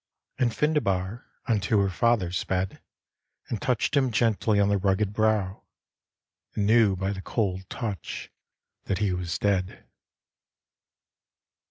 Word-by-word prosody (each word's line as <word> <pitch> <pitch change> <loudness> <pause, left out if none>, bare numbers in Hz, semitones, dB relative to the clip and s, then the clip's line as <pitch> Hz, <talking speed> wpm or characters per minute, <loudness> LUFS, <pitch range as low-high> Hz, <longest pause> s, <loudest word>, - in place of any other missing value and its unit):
..." - - -33
And 125 -2 +3
Findebar 110 -7 0 0.2
unto 105 -2 +2
her 100 -1 +1
father 105 -2 +2
sped 95 +1 -2 0.7
And 110 -5 -3
touched 125 +3 0
him 135 -2 +3
gently 110 -2 +2
on 100 - +4
the 100 -1 +2
rugged 100 +1 +1
brow. 105 -3 +1 0.9
And 105 - +1
knew 110 -2 +5
by 95 +1 -2
the 95 -1 -5
cold 95 -3 -2
touch 105 -8 -5 0.5
that 95 - -1
he 100 -2 +1
was 90 -2 -2
dead. 95 -2 -1
100 Hz, 130 wpm, -26 LUFS, 95-115 Hz, 0.9 s, knew